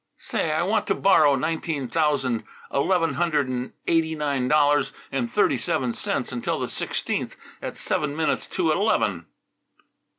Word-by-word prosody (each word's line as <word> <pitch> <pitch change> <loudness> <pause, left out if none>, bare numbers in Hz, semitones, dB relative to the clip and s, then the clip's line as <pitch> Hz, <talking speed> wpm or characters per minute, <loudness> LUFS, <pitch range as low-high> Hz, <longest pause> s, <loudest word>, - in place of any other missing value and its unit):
"Say, 155 - -2
I 155 - +1
want 210 +3 0
to - - +2
borrow 170 -7 +5
nineteen 155 -1 -2
thousand 130 -5 +1 0.3
eleven 165 +3 +2
hundred 155 -5 +1
and 125 0 -3
eighty 160 -1 +2
nine 140 -4 -1
dollars 145 0 +3 0.2
and 240 - -1
thirty 205 - +2
seven 120 +1 -1
cents - - -2
until - - -2
the - - -2
sixteenth - - -2 0.3
at - - -5
seven 150 -1 -1
minutes 160 0 0
to 170 -4 0
eleven." 105 - +1
150 Hz, 145 wpm, -24 LUFS, 130-165 Hz, 0.3 s, borrow